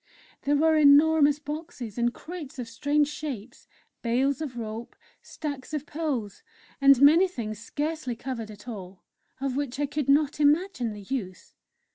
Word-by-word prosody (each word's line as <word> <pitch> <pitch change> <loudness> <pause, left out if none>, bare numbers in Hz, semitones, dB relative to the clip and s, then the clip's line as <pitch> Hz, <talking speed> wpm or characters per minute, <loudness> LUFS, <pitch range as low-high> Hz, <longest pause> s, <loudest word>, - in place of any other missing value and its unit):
There 290 +1 +1
were 315 +2 +4
enormous 295 0 +6
boxes 295 - -7
and 240 0 +1
crates 320 -2 -9
of 245 -2 -5
strange 285 +6 +1
shapes, 265 -6 -7 0.3
bales 260 +4 +1
of 270 -6 -5
rope, 225 0 -6 0.3
stacks 290 -1 -6
of 300 -1 -3
poles, 285 -11 -3 0.4
and 275 -2 +7
many 315 +7 +7
things 215 - -5
scarcely 295 +1 -3
covered 230 -2 -5
at 210 +2 -12
all, 190 -5 -8 0.4
of 270 -1 -2
which 275 -2 -3
I 290 - +2
could 290 -1 -3
not 290 +1 +3
imagine 300 - +2
the 205 -1 -9
use. 190 -5 -5
275 Hz, 150 wpm, -27 LUFS, 235-300 Hz, 0.4 s, and